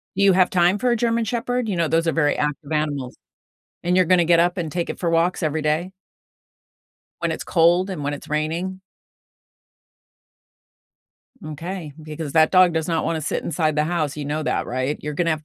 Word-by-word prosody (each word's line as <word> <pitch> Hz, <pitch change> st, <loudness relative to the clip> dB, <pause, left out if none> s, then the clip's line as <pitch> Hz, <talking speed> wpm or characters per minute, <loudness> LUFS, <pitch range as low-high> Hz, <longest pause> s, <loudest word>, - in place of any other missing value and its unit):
You 195 Hz, 0 st, +4 dB
have 185 Hz, 0 st, +4 dB
time 180 Hz, +2 st, +3 dB
for 250 Hz, +4 st, 0 dB
a -, -, +3 dB
German 230 Hz, 0 st, +1 dB
shepherd? 240 Hz, +1 st, -2 dB
You 195 Hz, -, -1 dB
know, 170 Hz, -1 st, +1 dB
those 165 Hz, +1 st, +1 dB
are -, -, +3 dB
very 150 Hz, -2 st, +1 dB
active 150 Hz, 0 st, -3 dB
animals. 145 Hz, -4 st, -2 dB, 0.7 s
And 180 Hz, +1 st, +1 dB
you're 185 Hz, -, +5 dB
gonna 180 Hz, 0 st, +4 dB
get 170 Hz, 0 st, +4 dB
up 175 Hz, +2 st, +2 dB
and 170 Hz, -4 st, -3 dB
take 175 Hz, -1 st, -2 dB
it -, -, -6 dB
for 170 Hz, -, -1 dB
walks 165 Hz, +3 st, +1 dB
every 155 Hz, 0 st, -1 dB
day? 155 Hz, +5 st, -1 dB, 1.3 s
When -, -, 0 dB
it's -, -, -6 dB
cold 175 Hz, +3 st, +3 dB
and 180 Hz, -6 st, -5 dB
when 145 Hz, +1 st, -2 dB
it's 145 Hz, -, -9 dB
raining? 165 Hz, +5 st, -2 dB, 2.6 s
M'kay, 155 Hz, +1 st, -6 dB
because 155 Hz, -1 st, -6 dB
that 160 Hz, -1 st, +4 dB
dog 185 Hz, -2 st, +5 dB
does 160 Hz, -1 st, -1 dB
not 165 Hz, -2 st, 0 dB
wanna 160 Hz, -1 st, -1 dB
sit 150 Hz, -, -2 dB
inside 155 Hz, -3 st, 0 dB
the 150 Hz, -, +2 dB
house, 155 Hz, -4 st, -2 dB
you 145 Hz, -, -4 dB
know 150 Hz, +2 st, -2 dB
that, -, -, -1 dB
right? 130 Hz, +4 st, -2 dB
You're 150 Hz, 0 st, -5 dB
gonna 170 Hz, +2 st, 0 dB
have 155 Hz, -2 st, 0 dB
165 Hz, 200 wpm, -22 LUFS, 150-180 Hz, 2.6 s, you're